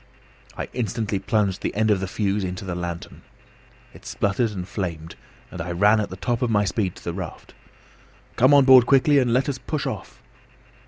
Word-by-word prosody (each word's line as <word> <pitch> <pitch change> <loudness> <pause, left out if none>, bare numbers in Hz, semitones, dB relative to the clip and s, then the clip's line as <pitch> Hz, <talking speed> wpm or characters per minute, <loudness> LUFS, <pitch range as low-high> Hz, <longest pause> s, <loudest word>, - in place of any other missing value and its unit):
I - - -4
instantly 110 -4 -2
plunged 100 -1 0
the - - -3
end 110 +1 +2
of 100 - +2
the 95 - -3
fuse 100 +1 -1
into 95 +2 -5
the 90 - -4
lantern. 85 -1 -6 0.7
It - - -15
spluttered 105 +4 -1
and 95 -4 -6
flamed, 85 -6 -5 0.4
and - - -6
I 85 +1 -4
ran 105 +5 +4
at 105 - -2
the 95 - -8
top 120 +4 -2
of 125 - +1
my 105 -2 +2
speed 95 -2 -1
to - - -14
the 85 - -4
raft. 90 -3 -8 0.8
"Come 130 +3 +4
on 140 -2 +6
board 130 -2 +7
quickly, 140 +1 +4
and 125 -3 +1
let 130 +3 +2
us 140 -2 -3
push 155 -3 -4
off." - - -6
105 Hz, 200 wpm, -23 LUFS, 95-120 Hz, 0.8 s, board